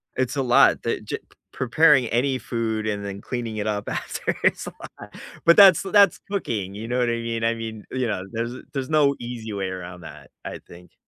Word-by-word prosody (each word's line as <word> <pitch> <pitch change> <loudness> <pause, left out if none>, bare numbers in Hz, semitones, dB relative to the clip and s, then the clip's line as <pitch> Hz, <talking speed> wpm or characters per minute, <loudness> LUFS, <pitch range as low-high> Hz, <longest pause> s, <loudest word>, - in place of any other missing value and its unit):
It's 130 +1 -1
a 135 - 0
lot, 120 -1 +4
that - - -2
g - - -3
p - - -24 0.3
preparing 135 0 +4
any 130 +3 0
food 110 -2 -2
and 100 -1 -2
then 100 0 -6
cleaning 120 -3 -4
it 105 0 -2
up 105 -1 -2
after - - -3
is - - +2
a - - -7 0.3
lot, - - -11 0.3
but 170 - +7
that's 195 -5 +8
that's 200 -1 +4
cooking, 110 - -3
you 110 +2 -6
know 125 - -1
what 120 -1 +2
I - - +1
mean? 115 -1 -3
I 115 0 +2
mean, 110 -2 -7
you 130 -1 -1
know, 95 -4 -2
there's 115 +1 -3 0.2
there's 135 -2 -3
no 145 -3 +3
easy 120 -3 -6
way 95 -1 -2
around 90 -1 -8
that, - - -12
I - - -6
think. 90 +1 -15
115 Hz, 215 wpm, -23 LUFS, 105-130 Hz, 0.3 s, that's